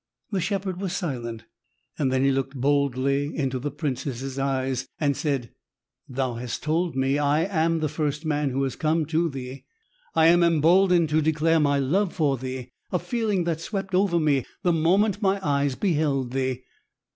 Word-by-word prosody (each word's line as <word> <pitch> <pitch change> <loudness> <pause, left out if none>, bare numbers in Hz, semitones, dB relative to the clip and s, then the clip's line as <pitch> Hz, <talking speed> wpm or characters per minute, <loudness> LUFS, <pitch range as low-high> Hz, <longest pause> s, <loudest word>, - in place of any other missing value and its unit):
The 195 -3 0
shepherd 190 -1 -2
was 190 -3 -2
silent. 120 - -4 0.6
Then 130 -2 +1
he 135 - +4
looked 135 +1 -2
boldly 140 +1 +1
into 135 -3 -1
the 145 +4 -3
princess' 135 -2 -4
eyes 130 -1 -1
and 145 -2 +1
said: 135 -6 -2 0.6
"Thou 130 -1 -1
hast 120 0 -5
told 165 +1 0
me 135 +2 +1
I 145 +2 +2
am 165 -3 +1
the 155 - +1
first 150 0 -2
man 150 -2 0
who 135 +1 -1
has 135 - -2
come 160 0 +1
to 165 +2 +1
thee. 130 -1 -7 0.5
I 160 - +5
am 175 +1 +6
emboldened 170 +1 +4
to 155 +1 +2
declare 160 +1 +2
my 145 -2 +2
love 175 +8 +1
for 150 -5 +2
thee, 130 -1 -6 0.2
a 180 - +2
feeling 215 -3 -1
that 165 -2 -2
swept 195 +1 -4
over 180 -2 +3
me 145 -5 +2 0.2
the 175 -2 +3
moment 190 +6 +2
my 195 -1 +2
eyes 140 -1 +1
beheld 145 -9 0
thee. 130 -1 -2
150 Hz, 170 wpm, -25 LUFS, 135-170 Hz, 0.6 s, am